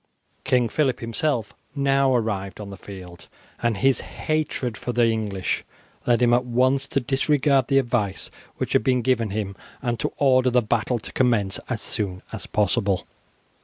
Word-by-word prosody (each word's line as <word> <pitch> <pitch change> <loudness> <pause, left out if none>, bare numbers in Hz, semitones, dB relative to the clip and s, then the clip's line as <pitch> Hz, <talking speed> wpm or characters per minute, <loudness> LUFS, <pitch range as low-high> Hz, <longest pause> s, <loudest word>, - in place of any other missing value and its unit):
King 125 -2 +2
Phillip 135 0 0
himself 115 +1 -1 0.2
now 140 -1 +3
arrived 105 -5 -2
on 100 -1 -7
the - - -7
field 90 -3 -11 0.3
and 115 -3 +1
his 135 +4 +3
hatred 150 -6 -2
for 120 - -4
the 120 0 +3
English 105 -4 -1 0.4
led 120 0 +4
him 120 0 +4
at 125 +1 +4
once 130 +3 +2
to 140 - 0
disregard 135 0 +2
the 135 - +3
advice 120 -7 0 0.3
which - - -2
had - - +3
been 125 0 +2
given 115 -3 +1
him 100 -1 -3 0.2
and 120 -2 -2
to - - -1
order 130 -2 +4
the 125 -1 +3
battle 120 +3 0
to 110 - -9
commence 115 -7 +2
as 120 -4 -2
soon 95 -5 -2
as - - -6
possible. 100 -2 +1
120 Hz, 165 wpm, -24 LUFS, 105-130 Hz, 0.4 s, led